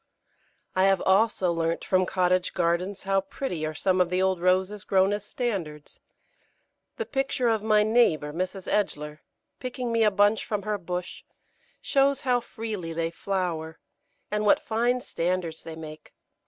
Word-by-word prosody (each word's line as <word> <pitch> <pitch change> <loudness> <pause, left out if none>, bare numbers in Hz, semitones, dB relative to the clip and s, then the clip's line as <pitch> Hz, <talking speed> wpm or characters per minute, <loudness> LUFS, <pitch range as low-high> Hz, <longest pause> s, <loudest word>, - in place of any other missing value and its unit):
I 185 0 +4
have 195 -1 +3
also 190 -2 +3
learnt 165 0 -1
from 185 -1 +2
cottage 185 -1 +1
gardens 180 +3 0
how 195 0 +2
pretty 180 - -4
are 155 - -5
some 185 +3 +2
of 180 - +2
the 180 +1 0
old 190 -2 +1
Roses 185 +3 +1
grown 190 +1 +3
as 205 -1 -3
standards. 185 - -4 1.0
The 460 - -2
picture 270 - -1
of 220 -2 +1
my 215 -1 +4
neighbour, 210 -10 +2
Mrs. 185 +2 -4
Edgeler, 150 -7 -1 0.4
picking 250 -1 -4
me 230 -1 +3
a 215 - +6
bunch 205 +2 +3
from 210 -2 -3
her 210 -1 -2
bush, 180 0 -5 0.6
shows 275 0 +2
how 250 -2 +2
freely 215 -8 -5
they 165 0 -1
flower, 170 -3 -3 0.5
and 210 0 0
what 210 - +5
fine 240 +3 0
standards 175 -5 -2
they 160 - -8
make. 155 -1 -10
190 Hz, 155 wpm, -26 LUFS, 170-215 Hz, 1.0 s, a